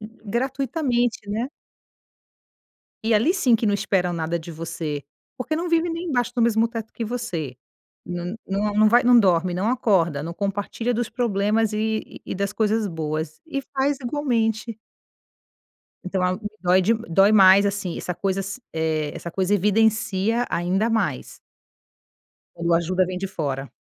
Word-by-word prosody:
gratuitamente, 245 Hz, +3 st, -1 dB
né. 225 Hz, +5 st, -2 dB, 1.6 s
E 225 Hz, -, +2 dB
ali 235 Hz, -, +3 dB
sim, 255 Hz, -11 st, +3 dB
que 225 Hz, 0 st, +1 dB
não 205 Hz, -, +2 dB
esperam 190 Hz, -3 st, 0 dB
nada 165 Hz, +1 st, -2 dB
de 165 Hz, +1 st, -9 dB
você. 160 Hz, -3 st, -5 dB, 0.3 s
Porque 275 Hz, +5 st, -2 dB
não 340 Hz, +2 st, -2 dB
vive 335 Hz, 0 st, +2 dB
nem 335 Hz, +2 st, -4 dB
embaixo 245 Hz, -4 st, 0 dB
no 240 Hz, -, 0 dB
mesmo 230 Hz, 0 st, +3 dB
teto 225 Hz, -1 st, -6 dB
que 230 Hz, -, -4 dB
você. 175 Hz, -, -4 dB, 0.5 s
N 175 Hz, +2 st, -4 dB
nu 205 Hz, +2 st, 0 dB
num 215 Hz, 0 st, +5 dB
vai 240 Hz, +3 st, +5 dB
não 245 Hz, 0 st, +6 dB
dorme, 180 Hz, -3 st, +2 dB
não 185 Hz, +5 st, -1 dB
acorda, 180 Hz, -, +1 dB
não 165 Hz, -, -5 dB
compartilha 205 Hz, +5 st, -2 dB
dos 235 Hz, -1 st, -2 dB
problemas, 220 Hz, -2 st, +1 dB
e 220 Hz, 0 st, 0 dB, 0.2 s
e -, -, -5 dB
e -, -, -3 dB
das 200 Hz, +1 st, -1 dB
coisas 220 Hz, 0 st, +1 dB
boas. 155 Hz, -, -4 dB
E 275 Hz, -4 st, -3 dB
faz 275 Hz, 0 st, -1 dB
igualmente. 230 Hz, -5 st, -1 dB, 1.3 s
Então 185 Hz, 0 st, -2 dB
é -, -, +3 dB
algo 185 Hz, +4 st, -2 dB
que 215 Hz, +1 st, -7 dB
dói 185 Hz, +1 st, +4 dB, 0.3 s
dói 195 Hz, +5 st, +5 dB
mais 195 Hz, -1 st, +7 dB
assim, 200 Hz, -3 st, -2 dB
essa 180 Hz, -, -4 dB
coisas 195 Hz, +5 st, -2 dB
eh, 160 Hz, -2 st, -1 dB
essa 170 Hz, -, -6 dB
coisa 190 Hz, +3 st, +1 dB
evidencia 220 Hz, +2 st, +2 dB
ainda 190 Hz, +6 st, 0 dB
mais. 195 Hz, -, -1 dB, 1.2 s
Quando 170 Hz, 0 st, -1 dB
a -, -, +6 dB
ajuda 185 Hz, +2 st, +1 dB
vem 180 Hz, 0 st, -4 dB
de 195 Hz, -, -3 dB
fora. 140 Hz, -7 st, -3 dB
205 Hz, 160 wpm, -23 LUFS, 180-235 Hz, 1.6 s, mais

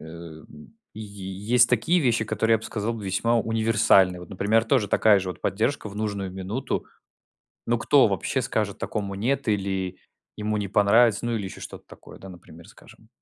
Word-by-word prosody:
м, 80 Hz, -, -12 dB, 0.2 s
й 110 Hz, -, -8 dB
есть 105 Hz, +4 st, 0 dB
такие 125 Hz, +10 st, +2 dB
вещи, 115 Hz, -5 st, +1 dB
которые, 115 Hz, +1 st, +1 dB
я 110 Hz, -, +2 dB
б -, -, -13 dB
сказал, 115 Hz, +2 st, -3 dB
весьма 105 Hz, +4 st, 0 dB
универсальны. 110 Hz, -5 st, +3 dB
Вот 90 Hz, -, -11 dB
например, 105 Hz, +4 st, +1 dB
тоже 125 Hz, -7 st, +1 dB
такая 105 Hz, +1 st, +4 dB
же 95 Hz, -, -4 dB
вот -, -, -10 dB
поддержка 110 Hz, +5 st, -1 dB
в 100 Hz, -, -11 dB
нужную 100 Hz, -3 st, -3 dB
минуту, 95 Hz, +8 st, -4 dB, 0.8 s
ну -, -, +1 dB
кто -, -, +4 dB
вообще -, -, -2 dB
скажет -, -, -2 dB
такому 100 Hz, -2 st, -4 dB
нет, 130 Hz, +5 st, -1 dB
или 95 Hz, -3 st, -2 dB, 0.4 s
ему 105 Hz, 0 st, -2 dB
не 100 Hz, -, -3 dB
понравится, 105 Hz, +3 st, +3 dB
ну 120 Hz, -, -1 dB
или 100 Hz, -, -4 dB
ещё 95 Hz, -, -8 dB
что-то -, -, -9 dB
такое, -, -, -14 dB
да, 95 Hz, -, -11 dB
например 85 Hz, -2 st, -14 dB
скажем. 110 Hz, -, -18 dB
105 Hz, 175 wpm, -24 LUFS, 95-115 Hz, 0.8 s, такая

